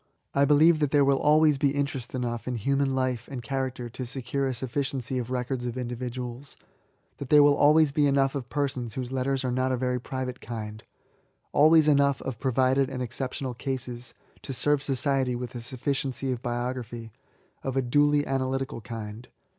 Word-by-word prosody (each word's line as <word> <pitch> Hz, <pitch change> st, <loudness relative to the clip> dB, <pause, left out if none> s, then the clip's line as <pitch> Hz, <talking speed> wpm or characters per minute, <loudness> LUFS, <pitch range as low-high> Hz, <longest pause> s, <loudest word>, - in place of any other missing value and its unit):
I 140 Hz, 0 st, +4 dB
believe 155 Hz, +3 st, +5 dB
that 150 Hz, -2 st, +1 dB
there 145 Hz, -1 st, +4 dB
will 135 Hz, -1 st, +3 dB
always 150 Hz, -1 st, +4 dB
be 140 Hz, -1 st, +2 dB
interest 140 Hz, -3 st, -3 dB
enough 120 Hz, -2 st, -3 dB
in 125 Hz, -, -1 dB
human 135 Hz, +4 st, 0 dB
life 130 Hz, -3 st, -1 dB
and 125 Hz, -3 st, -5 dB
character 130 Hz, -2 st, -3 dB
to 125 Hz, +2 st, -6 dB
secure 135 Hz, +2 st, -2 dB
a 130 Hz, -, -1 dB
sufficiency 130 Hz, 0 st, -2 dB
of 120 Hz, -1 st, -5 dB
records 125 Hz, 0 st, -2 dB
of 120 Hz, +1 st, -4 dB
individuals: 125 Hz, +1 st, -5 dB, 0.3 s
— -, -, -42 dB
that 140 Hz, -, -7 dB
there 150 Hz, -1 st, +7 dB
will 145 Hz, 0 st, +6 dB
always 150 Hz, +1 st, +5 dB
be 145 Hz, 0 st, +3 dB
enough 135 Hz, -1 st, +2 dB
of 130 Hz, -4 st, -5 dB
persons 135 Hz, -5 st, -2 dB
whose 125 Hz, -1 st, -4 dB
letters 135 Hz, +1 st, -1 dB
are 125 Hz, -, 0 dB
not 130 Hz, +1 st, 0 dB
of 130 Hz, -, 0 dB
a 130 Hz, -, -2 dB
very 125 Hz, 0 st, 0 dB
private 130 Hz, -1 st, -5 dB
kind, 110 Hz, -2 st, -6 dB, 0.4 s
— -, -, -38 dB, 0.3 s
always 155 Hz, +1 st, +6 dB
enough 140 Hz, -3 st, +4 dB
of 125 Hz, -4 st, -5 dB
provided 130 Hz, +1 st, +2 dB
and 130 Hz, -2 st, -3 dB
exceptional 130 Hz, +1 st, -4 dB
cases 120 Hz, 0 st, -5 dB, 0.3 s
to 135 Hz, -, -6 dB
serve 145 Hz, +2 st, +1 dB
society 135 Hz, -2 st, 0 dB
with 125 Hz, 0 st, -5 dB
a 120 Hz, -, -6 dB
sufficiency 135 Hz, +1 st, -2 dB
of 125 Hz, -2 st, -3 dB
biography, 120 Hz, -2 st, -4 dB, 0.5 s
of 135 Hz, 0 st, -3 dB
a -, -, +4 dB
duly 145 Hz, +3 st, +3 dB
analytical 135 Hz, -2 st, -2 dB
land. 110 Hz, 0 st, -6 dB
130 Hz, 185 wpm, -27 LUFS, 125-140 Hz, 0.5 s, there